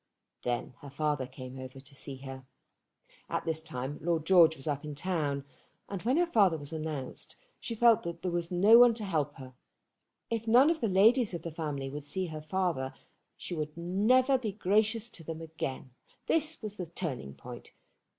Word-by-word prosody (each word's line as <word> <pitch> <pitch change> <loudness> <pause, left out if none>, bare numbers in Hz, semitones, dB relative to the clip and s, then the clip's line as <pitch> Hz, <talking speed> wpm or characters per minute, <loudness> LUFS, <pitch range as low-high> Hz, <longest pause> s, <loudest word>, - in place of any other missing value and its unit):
Then 120 +1 -2
her 145 - -10
father 145 -2 -1
came 130 0 -9
over 130 +1 -8
to 140 +2 -13
see 140 0 -7
her. 130 -1 -8 0.8
At - - -2
this 160 -1 -1
time 145 -2 -5
Lord 165 -1 0
George 165 -3 +6
was 135 - -8
up 145 -1 -1
in 150 -1 -6
town, 145 -4 -1 0.4
and 195 -3 -5
when 255 +6 +1
her 350 - +4
father 200 - +3
was 145 +1 -7
announced 155 -4 -5 0.2
she 230 - -5
felt 230 0 +5
that 170 -1 -6
there 180 - -1
was 170 -1 -1
no 200 +6 +7
one 245 -2 +7
to 220 - -5
help 155 -7 -1
her. 130 -1 -11 0.8
If 230 0 -2
none 255 +7 +6
of 325 - -2
the 225 - +1
ladies 210 +2 +4
of 165 - -6
the 170 - -5
family 150 -4 -4
would 145 +2 -6
see 190 +5 -2
her 155 -3 -6
father 155 -5 -1 0.4
she 175 - -5 0.2
never 210 +10 +3
would 260 - +3
be 215 -5 -2
gracious 215 +3 +1
to 165 - -9
them 160 0 -6
again. 155 -5 -5 0.3
This 315 -3 +1
was 210 -1 -5
the 180 - -4
turning 135 - -4
point. - - -10
165 Hz, 190 wpm, -30 LUFS, 145-210 Hz, 0.8 s, no